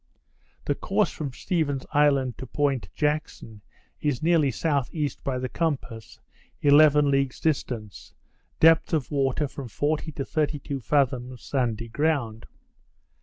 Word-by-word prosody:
The - - +1
course - - 0
from 145 -4 -5
Stephens 145 -2 -2
Island 140 -4 +3
to 130 - -7
Point 140 -1 -1
Jackson, 150 -8 -2 0.4
is 145 -1 -1
nearly 165 -3 +4
S.E. 145 +2 -1
by 135 -2 -1
the 130 0 -2
compass, 135 -8 -4 0.4
eleven 145 0 +5
leagues 135 -2 0
distant, 120 - -3 0.5
depth 165 +1 +5
of 155 -3 0
water 140 +1 0
from 135 -1 -8
forty 150 +7 -2
to 140 -1 -4
thirty 150 0 -1
two 140 -1 -5
fathoms, 130 -2 0
sandy 115 -4 -1
ground. 120 -4 -1
140 Hz, 125 wpm, -25 LUFS, 125-150 Hz, 0.5 s, eleven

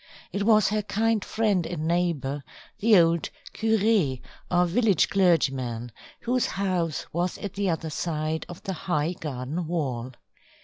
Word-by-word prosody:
It 200 - -2
was 215 -1 +4
her 215 +1 0
kind 220 +1 0
friend 210 -5 +1
and 160 -3 -3
neighbour, 160 -5 0 0.4
the 215 -1 +6
old 170 -1 +3 0.2
curé 215 - +2 0.3
or 180 0 +3
village 200 0 +2
clergyman, 135 - +1 0.3
whose 250 +1 +1
house 180 -5 -1
was 175 +2 -1
at 200 - -6
the 200 -1 0
other 160 -1 -2
side 155 0 -2
of 175 - -10
the 195 - -3
high 160 -1 -1
garden 150 +2 -4
wall. 130 -7 -2
175 Hz, 140 wpm, -26 LUFS, 155-200 Hz, 0.4 s, the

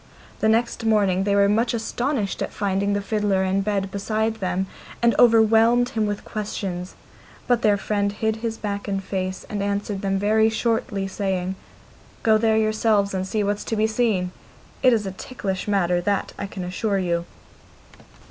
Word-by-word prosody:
The 220 - +2
next 230 +1 +1
morning 200 -4 +2
they 200 -1 +2
were 200 0 +5
much 230 +4 +1
astonished 235 -1 -2
at - - -2
finding 200 0 0
the 200 0 -1
fiddler 205 -2 +1
in 190 +1 +1
bed 195 -1 -1
beside 220 +2 -1
them, 190 -2 -1 0.3
and 235 0 +3
overwhelmed 230 +1 +5
him 220 -2 0
with 205 -1 -4
questions; 190 -4 -4 0.5
but 245 -2 +2
their 205 -1 +4
friend 200 0 -1
hid 220 +1 -1
his 225 0 -3
back 200 -1 -4
and 195 -1 -2
face, 185 -1 -3
and 205 -1 -3
answered 200 0 -2
them 195 -1 0
very 220 +2 +3
shortly, 220 -3 -1
saying, 190 -2 -2 0.7
'Go 220 -1 +4
there 220 -1 +3
yourselves, 215 -2 +2
and 190 0 -2
see 210 +1 0
what's 205 +1 -1
to 225 - -2
be 215 0 +2
seen! 215 -5 0 0.5
It 255 - +6
is 220 -3 +1
a 190 - -3
ticklish 190 -1 -5
matter, 180 -3 +2
that 200 +2 -1
I 200 - -5
can 195 -2 -6
assure 195 +3 -1
you. 170 -2 -1
205 Hz, 175 wpm, -23 LUFS, 195-220 Hz, 0.7 s, It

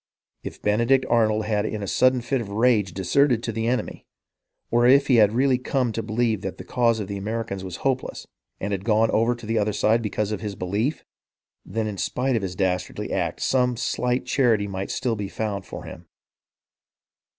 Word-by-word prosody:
If - - -9
Benedict 120 +5 +3
Arnold 110 -2 +2
had 105 -1 0
in 110 -1 -3
a - - -4
sudden 130 +8 +3
fit 125 +2 -1
of 105 - -7
rage 105 -2 +2
deserted 115 - +2
to 115 - -2
the 115 +1 -2
enemy, 125 +1 -2 0.6
or 120 +1 +4
if 140 +2 +6
he 130 -3 +4
had 105 -2 +6
really 130 +2 +2
come 125 -2 0
to 115 - -3
believe 110 -1 0
that 95 - -5
the - - -8
cause 115 -2 +1
of 105 - -4
the 100 0 -4
Americans 100 -1 -4
was 90 -2 -6
hopeless, 130 -1 -1 0.3
and 100 - -3
had 95 -2 -2
gone 110 +1 +3
over 115 +2 +2
to 120 -1 -11
the 110 +1 0
other 105 0 0
side 110 +3 +2
because 105 -1 -2
of 105 - -3
his 105 -2 -4
belief, 100 - -2 0.6
then 110 +4 -3
in 105 -3 -4
spite 130 0 0
of 110 - 0
his 95 -2 -4
dastardly 90 -2 -2
act - - -2
some 125 -2 +2
slight 125 +1 -1
charity 115 -6 +2
might 95 0 -4
still 120 -3 -1
be 100 -2 -4
found 100 -2 -4
for - - -8
him. - - -10
110 Hz, 200 wpm, -24 LUFS, 100-125 Hz, 0.6 s, if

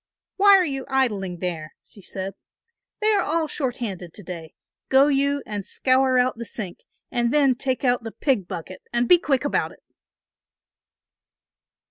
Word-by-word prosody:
"Why 400 0 +8
are 370 - +3
you 270 -3 -3
idling 210 -9 0
there?" 165 -4 -4
she 205 - -12
said. 190 +1 -6 0.7
"They 430 +1 +3
are 415 - +3
all 320 +1 0
short 260 -5 -2
handed 185 -7 -5
to 205 - -10
day, 170 -3 -8 0.3
go 270 +2 +6
you 280 0 +1
and 205 -2 -4
scour 260 +4 +2
out 250 -1 +2
the - - -3
sink 200 -6 -5 0.3
and 240 -1 +1
then 280 -2 +4
take 260 +1 -2
out 245 -1 +2
the 225 -1 -6
pig 240 - 0
bucket 180 +2 -7
and 240 0 +1
be 350 - +7
quick 275 -5 +1
about 285 - 0
it." - - -22
250 Hz, 165 wpm, -24 LUFS, 195-275 Hz, 0.7 s, Why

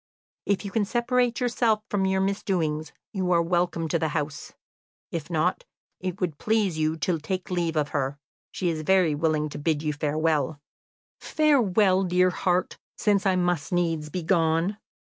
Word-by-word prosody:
If 200 +1 0
you 200 - -5
can 220 0 +1
separate 240 +2 +1
yourself 235 -3 +1
from 195 -2 +1
your 190 0 +1
misdoings, 175 -6 -1 0.2
you 185 -3 -1
are 170 - +4
welcome 175 -1 0
to 165 - +1
the 160 - +1
house; 150 0 -4 0.6
if - - -4
not, - - 0 0.4
if 185 -1 -3
it 200 - -23
would 165 -5 -2
please 215 -5 +1
you 155 +1 +1
to 165 +1 0
take 185 +4 -4
leave 170 -2 0
of 150 -1 +1
her, 140 -1 -2 0.3
she 180 - -3
is 160 -2 -2
very 180 -1 +3
willing 155 0 0
to 145 - -7
bid 155 0 0
you 150 -1 0
farewell." 150 -1 0 0.6
"Farewell, 215 -11 +3
dear 180 +1 +3
heart, 180 0 0 0.2
since 205 -2 +2
I 190 - +3
must 175 -4 0
needs 165 -4 0
be 180 +3 -4
gone!" 165 +3 +1
175 Hz, 170 wpm, -26 LUFS, 155-195 Hz, 0.6 s, are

